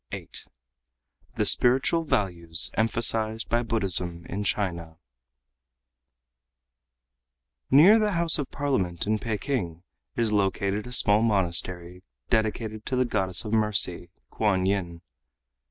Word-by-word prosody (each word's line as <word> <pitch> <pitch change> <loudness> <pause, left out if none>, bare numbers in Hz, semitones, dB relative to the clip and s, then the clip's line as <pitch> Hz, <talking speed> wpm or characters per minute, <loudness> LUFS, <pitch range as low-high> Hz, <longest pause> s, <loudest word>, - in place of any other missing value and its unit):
VIII - - -8 1.1
THE - - -1
SPIRITUAL 135 +7 +3
VALUES 85 - 0
EMPHASIZED 110 0 +1
BY 120 +1 +1
BUDDHISM 95 -7 0
IN 100 +3 -5
CHINA 85 -6 -3 2.7
Near 175 +12 +6
the 210 -1 -1
House 170 -2 +2
of 140 - -4
Parliament 115 -13 -3
in 110 +1 -1
Peking 105 - -4 0.3
is 110 -2 0
located 100 +2 -1
a - - -10
small 105 -3 +3
monastery 90 -4 -1 0.3
dedicated 110 0 -2
to 130 - -2
the 130 0 +1
goddess 95 -4 +2
of 105 - -5
Mercy, 105 -5 +2 0.2
Kuan 95 -4 -1
Yin. 90 -4 -3
105 Hz, 110 wpm, -25 LUFS, 90-115 Hz, 2.7 s, Near